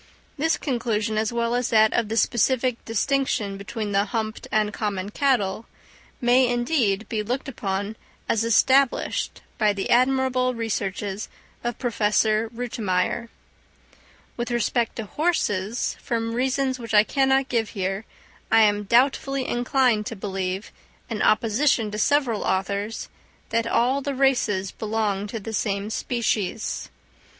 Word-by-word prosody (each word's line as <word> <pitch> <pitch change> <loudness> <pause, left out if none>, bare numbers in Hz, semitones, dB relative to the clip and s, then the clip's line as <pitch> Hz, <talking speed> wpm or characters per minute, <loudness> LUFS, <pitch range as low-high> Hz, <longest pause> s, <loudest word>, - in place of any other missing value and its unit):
This 320 +2 +1
conclusion, 225 -5 -1
as 215 +1 0
well 235 0 0
as 245 0 0
that 220 -1 +4
of 230 -3 0
the 225 - -2
specific 245 +3 +1
distinction 225 -3 0
between 205 +1 -5
the 200 +1 +2
humped 220 +1 -4
and 210 -1 +1
common 200 -2 -3
cattle, 230 -6 0 0.5
may, 250 0 +4
indeed, 240 -4 +1
be 220 -3 -2
looked 250 +7 -3
upon 205 -4 -3 0.3
as 225 - +1
established 260 +4 +2 0.2
by 210 -2 +3
the 195 -1 -3
admirable 255 0 +2
researches 205 -2 -3 0.3
of 240 -1 -2
Professor 220 -1 +1
Rütimeyer. 230 -2 -2 1.1
With 240 0 -3
respect 240 0 0
to 225 - -4
horses, 225 - -1
from 230 -1 -2
reasons 260 +1 0
which 230 -2 -3
I 210 - +8
cannot 270 +2 +1
here 200 -4 -1
give, - - -25 0.5
I 225 - +7
am 205 -1 +2
doubtfully 265 +3 +2
inclined 245 -3 +1
to 230 - -5
believe, 190 -1 -4 0.4
in 220 - -2
opposition 225 0 +2
to 210 - -4
several 255 -4 +2
authors, 200 +3 -2 0.4
that 230 0 0
all 255 +4 +2
the 280 0 -3
races 230 -8 +1
belong 210 -2 -2
to 225 +2 -5
the 220 +2 -7
same 200 0 -1
species. 220 -3 -2
225 Hz, 135 wpm, -24 LUFS, 210-250 Hz, 1.1 s, I